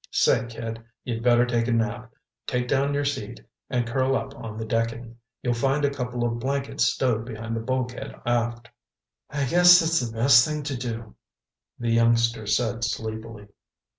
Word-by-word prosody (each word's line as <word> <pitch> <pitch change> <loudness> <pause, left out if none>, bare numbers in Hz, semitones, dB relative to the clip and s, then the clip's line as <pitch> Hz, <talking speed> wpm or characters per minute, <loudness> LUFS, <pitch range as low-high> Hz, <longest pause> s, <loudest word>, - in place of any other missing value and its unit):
"Say, - - +2
kid, 115 0 -6 0.2
you'd 115 -2 -3
better 120 0 +4
take 120 -1 0
a - - 0
nap. 115 +1 -1 0.4
Take 125 0 -1
down 140 +2 +1
your 145 0 0
seat 125 -5 -3 0.3
and 125 -2 0
curl 130 +3 +1
up 135 0 -3
on 110 -4 -8
the 110 - -4
decking. 115 +1 -2 0.3
You'll 125 - +1
find 135 +4 +1
a 140 - +1
couple 125 -3 -3
of 120 0 -2
blankets 140 +2 -1
stowed 120 -4 +1
behind 115 -1 -5
the - - -1
bulkhead 125 +1 -3
aft." 120 -1 -1 0.6
"I 145 -1 -1
guess 175 +5 +7
that's 165 0 +2
the 120 -2 -3
best 120 +1 +6
thing 150 0 -2
to 140 -1 -3
do," 115 -3 -5 0.6
the 120 -1 -1
youngster 115 -1 +2
said 115 +2 0
sleepily. 110 -2 -5
120 Hz, 170 wpm, -25 LUFS, 115-130 Hz, 0.6 s, guess